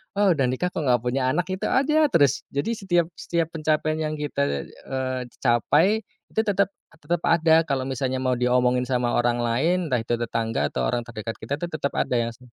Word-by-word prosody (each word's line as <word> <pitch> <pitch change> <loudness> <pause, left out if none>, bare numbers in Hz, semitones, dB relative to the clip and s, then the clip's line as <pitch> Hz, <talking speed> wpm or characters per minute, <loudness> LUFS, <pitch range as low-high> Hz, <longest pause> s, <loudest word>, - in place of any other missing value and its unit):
"Oh, 200 -2 +4
udah 135 -6 +2
nikah 155 +9 -1
kok - - -4
nggak 120 -1 +3
punya 130 +1 0
anak?" 175 +7 +1
Gitu 185 - -2
aja 305 +3 +3
terus. 145 - +2
Jadi 205 +12 0
setiap 180 -6 +1
setiap 165 -1 -1
pencapaian 155 -1 0
yang 155 -1 -2
kita, 70 - -1
eee, 130 -1 -4 0.2
capai 150 - +3 0.2
itu 220 - +1
tetep 200 -1 +2 0.2
tetep 165 +1 -3
ada 160 -1 +4
kalau 130 -1 0
misalnya 130 0 -2
mau 130 0 0
diomongin 125 0 +2
sama 125 -1 0
orang 120 0 +2
lain, 140 +10 +2
entah 125 -3 +1
itu 115 +1 -1
tetangga 115 -1 -1
atau - - -1
orang 120 -1 -2
terdekat 115 -1 -6
kita 115 +6 -5
itu 175 - -2
tetap 145 -3 -3
ada 125 - 0
yang 115 0 -1
se 125 - -23
135 Hz, 195 wpm, -24 LUFS, 125-170 Hz, 0.2 s, Oh